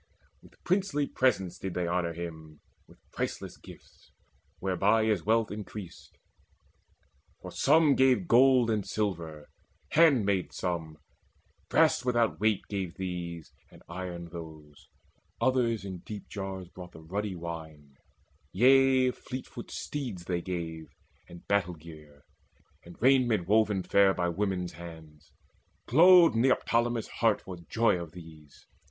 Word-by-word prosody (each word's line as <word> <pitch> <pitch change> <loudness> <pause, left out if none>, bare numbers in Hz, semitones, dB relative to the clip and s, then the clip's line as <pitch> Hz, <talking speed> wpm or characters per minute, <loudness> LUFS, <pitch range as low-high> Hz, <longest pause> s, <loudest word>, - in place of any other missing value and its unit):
With - - -19
princely 185 -6 0
presents 105 -11 0
did 95 -2 -5
they 90 -1 -1
honour 85 -1 -1
him, 80 -2 -8 0.3
With - - -19
priceless - - -4
gifts, - - -16 0.5
whereby 100 +4 +2
is 105 -6 +1
wealth 115 -1 +2
increased; 105 -3 -9 1.2
For - - -9
some 150 0 +4
gave 130 +6 +3
gold 125 -2 +5
and 105 -2 0
silver, 85 -9 -4 0.4
handmaids 115 - +3
some, 80 -4 -3 0.7
Brass - - +3
without 120 -3 +1
weight 110 -2 +2
gave 95 -4 -4
these, 85 -3 -6 0.2
and - - -18
iron 85 -1 -6
those; 80 -4 -11 0.5
Others 115 -4 +1
in 95 -2 -6
deep 105 +2 -9
jars 95 -2 -6
brought 90 0 -12
the 80 - -12
ruddy 100 +4 -3
wine: 80 -4 -8 0.6
Yea, 130 +3 +4
fleetfoot 125 -1 -8
steeds 120 -12 -5
they 90 -2 -2
gave, 85 -3 -5 0.4
and 85 0 -13
battle 90 -4 +1
gear, 75 -3 -14 0.6
And 85 0 -14
raiment 120 -8 +3
woven 105 -2 +2
fair 100 0 +4
by 90 -1 0
women's 90 -1 -2
hands. 80 -3 -12 0.5
Glowed 175 +5 +7
Neoptolemus' 120 -1 +1
heart 115 -3 +3
for 95 - -7
joy 115 -6 +2
of 85 -2 -9
these. 80 -4 -14
95 Hz, 125 wpm, -29 LUFS, 85-115 Hz, 1.2 s, Glowed